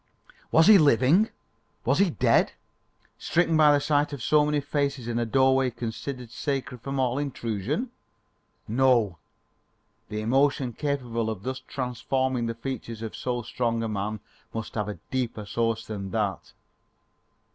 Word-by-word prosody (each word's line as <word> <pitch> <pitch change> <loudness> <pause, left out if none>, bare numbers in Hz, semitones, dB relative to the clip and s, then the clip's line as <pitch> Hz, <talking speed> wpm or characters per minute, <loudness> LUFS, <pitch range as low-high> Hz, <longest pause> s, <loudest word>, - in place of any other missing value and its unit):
Was 160 +1 +6
he 210 0 +9
living? 145 - +4 0.6
Was 135 +7 +2
he 200 -2 +4
dead? 110 - +2 0.7
stricken 165 -1 +1
by 155 -1 +6
the 145 - +4
sight 145 0 +1
of 135 -5 -6
so 150 -1 +4
many 150 0 +1
faces 140 -3 -2
in 120 0 -1
a 120 - -1
doorway 130 +1 +3
considered 120 +1 -6
sacred 135 -1 -3
from 135 +1 -3
all 130 +1 +1
intrusion? 140 - -3 0.8
No! 115 - +2 0.9
the 105 0 -3
emotion 135 +2 +2
capable 125 -6 -2
of 105 -3 -5
thus 130 +1 -3
transforming 130 -1 -1
the 115 - -3
features 115 -2 -6
of 110 - -5
so 120 -1 -2
strong 115 -1 -1
a - - -1
man 105 0 -3 0.3
must 115 - -4
have 105 -2 -2
a 105 - -5
deeper 120 -5 -2
source 115 +1 -1
than 100 -3 -5
that. 105 -2 -2
125 Hz, 145 wpm, -26 LUFS, 115-140 Hz, 0.9 s, he